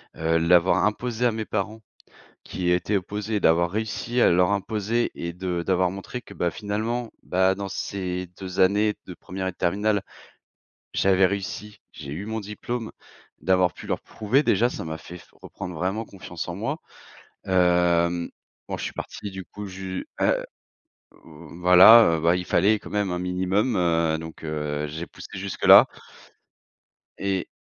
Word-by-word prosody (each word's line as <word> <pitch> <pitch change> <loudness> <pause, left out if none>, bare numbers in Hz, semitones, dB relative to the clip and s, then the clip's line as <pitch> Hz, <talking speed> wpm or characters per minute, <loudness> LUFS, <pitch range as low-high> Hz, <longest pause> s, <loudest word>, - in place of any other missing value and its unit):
heu, 80 0 +1
l'avoir 85 +2 +4
imposée 120 +2 -1
à - - +1
mes 110 0 -4
parents, 110 +2 -3 0.6
qui 90 - -4
y - - +3
étaient 90 +4 +1
opposés, 105 +2 -3
d'avoir 85 +1 +3
réussi 110 +3 -2
à - - +6
leur 90 +2 +3
imposer 105 +3 -1
et 85 0 -4
de 90 -1 -3
d'avoir 90 -1 +2
montré 100 +6 -7
que - - -13
bah, 85 - -1
finalement, 110 +5 -3
bah, 95 +1 +2
dans 100 0 -4
ces 90 -2 -4
2 95 -1 -4
années 105 +3 +3
de 90 - -8
première 95 +2 -5
et - - -4
de - - -34
terminale, 100 +3 +1 0.9
j'avais 95 -1 +4
réussi, 100 +2 -5
j'ai 70 -2 -9
eu 85 +7 -5
mon 110 +1 -3
diplôme. 110 +3 -5 0.5
D'avoir 90 -1 +3
pu - - -11
leur - - -2
prouver 115 +6 0
déjà, 120 -2 +3
ça - - -6
m'a 80 0 -5
fait 90 +2 -10
f - - -19
reprendre 90 -2 -7
vraiment 95 +7 -2
confiance 90 -5 -8
en 85 - -4
moi. 135 - -3 0.7
Hem, 90 -2 +2 0.4
bon, - - -3
je - - -5
suis - - -4
parti, 100 - -7
du 95 -1 -7
coup, 105 +4 -9
ju 95 -1 -6
ah, - - +3 0.9
voilà, 90 +5 +6
heu, 80 - -4
bah, 85 +2 +3
il 90 - -3
fallait 100 +7 +3
quand - - -11
même 105 -2 0
un 90 - -2
minimum, 95 +5 0
heu, 85 -2 +2
donc 80 0 -9
heu, 75 -1 -3
j'ai 80 +4 -6
poussé - - -12
jusque-là. 95 0 +6 1.3
Et 95 -2 -2
95 Hz, 165 wpm, -24 LUFS, 85-105 Hz, 1.3 s, à